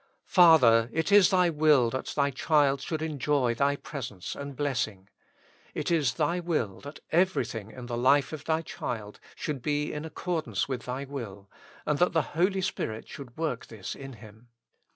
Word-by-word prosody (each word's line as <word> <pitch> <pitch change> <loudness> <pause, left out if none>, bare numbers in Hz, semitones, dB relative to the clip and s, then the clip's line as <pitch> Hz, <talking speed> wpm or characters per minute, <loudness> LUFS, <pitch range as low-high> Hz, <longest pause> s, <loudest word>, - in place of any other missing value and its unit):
Father! 125 - +6
it 160 +5 -1
is 200 -2 +7
Thy 180 -3 +3
ivill 150 -6 +4
that 130 - -4
Thy 140 -1 +2
child 140 0 +2
should 160 +1 -3
enjoy 145 -5 0
Thy 140 +3 +1
presence 120 - -6
and 140 -1 -7
blessing. 120 -9 -2 0.7
It - - -2
is 145 -7 +2
Thy 175 +6 0
will 155 - -2
that 145 +1 -10
everything 125 - 0
in 125 +2 -9
the 120 -1 -4
life 140 +4 +3
of 150 -1 -7
Thy 160 0 0
child 110 -8 -6 0.2
should 145 -4 -4
be 150 +2 -1
in 150 - -4
accordance 160 0 -2
with 130 -3 -4
Thy 130 +2 -4
will, 110 -8 -8 0.3
and 150 -1 0
that 180 +1 +3
the 160 -2 +2
Holy 190 +4 +1
Spirit 110 -11 -3
should 130 -3 -10
work 155 -7 -3
this 110 -4 -7
in 135 -1 -9
Him. 110 +1 -15
140 Hz, 175 wpm, -28 LUFS, 120-160 Hz, 0.7 s, is